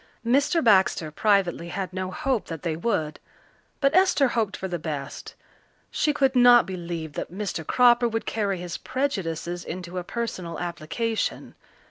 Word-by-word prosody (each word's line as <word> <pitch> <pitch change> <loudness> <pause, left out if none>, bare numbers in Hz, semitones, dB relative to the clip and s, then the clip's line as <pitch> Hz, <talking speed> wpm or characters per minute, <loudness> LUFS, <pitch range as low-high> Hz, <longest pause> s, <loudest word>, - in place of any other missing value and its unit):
Mr. 285 +7 +2
Baxter 190 -7 +3
privately 190 -2 +1
had 190 +1 -4
no 185 0 -3
hope 260 - -1
that 165 -1 -7
they 165 -3 -1
would, 160 -5 -2 0.6
but 275 +1 +2
Esther 360 -7 +4
hoped 220 -4 -1
for 190 - -4
the 175 -2 -3
best. 145 -3 -6 0.6
She 300 - +1
could 275 -2 +1
not 245 -1 +7
believe 170 -4 -5
that - - -5
Mr. 190 -3 -4
Cropper 240 +6 +4
would 225 0 -3
carry 200 -3 -1
his 175 -1 -6
prejudices 175 - -3
into 180 0 -5
a - - -5
personal 185 -6 -4
application. 175 +7 -3
190 Hz, 150 wpm, -25 LUFS, 170-240 Hz, 0.6 s, not